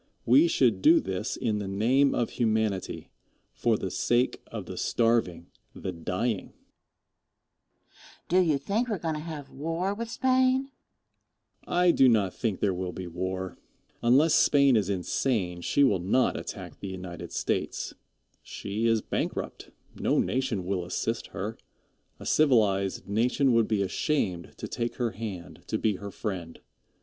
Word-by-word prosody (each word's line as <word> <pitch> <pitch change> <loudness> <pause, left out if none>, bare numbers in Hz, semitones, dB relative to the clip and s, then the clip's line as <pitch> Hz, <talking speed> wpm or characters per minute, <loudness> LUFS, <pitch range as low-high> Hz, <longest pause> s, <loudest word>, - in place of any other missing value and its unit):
We 135 +8 +6
should 120 - +2
do 165 - +7
this 95 +4 -3
in 110 -3 -1
the 100 - -4
name 125 +8 +2
of 120 - 0
humanity 110 -4 -1 0.4
for - - +1
the - - -4
sake 120 +2 +1
of - - -6
the - - -7
starving, 115 -8 0 0.2
the 95 - -4
dying. 90 +5 -3
Question. - - -29
Do 180 - +3
you 160 -6 +3
think 210 - -1
we 220 - -1
are - - -4
going 165 -2 -2
to 155 - -4
have 155 -4 -7
war 165 +7 -2
with 230 +2 -5
Spain? 260 +2 +2
Answer. - - -40
I 175 0 +4
do 135 -5 +5
not 105 -5 +2
think 110 -5 -2
there 100 -2 +2
will 90 0 -4
be 95 +2 -6
war. 95 +2 -4 0.4
Unless 135 +7 +4
Spain 140 -3 +5
is 105 -3 +1
insane, 95 -1 -1
she 145 - +2
will 105 -9 +3
not 100 +9 +2
attack - - -7
the 100 - -6
United 90 -2 -7
States. - - -2 0.5
She 105 +3 -3
is 115 -2 +2
bankrupt. - - -3 0.2
No - - 0
nation 125 -8 0
will 95 -1 -1
assist 115 +6 -2
her. 100 +3 -5 0.6
A - - -9
civilized 105 -12 +2
nation 125 +5 +2
would 115 -1 +3
be 105 -3 +1
ashamed 95 - -1
to - - -5
take 120 0 -3
her 120 -3 -1
hand, 95 -4 -7
to - - -1
be 105 -3 0
her 100 +1 -7
friend. 95 -6 -5
115 Hz, 160 wpm, -28 LUFS, 95-140 Hz, 0.6 s, do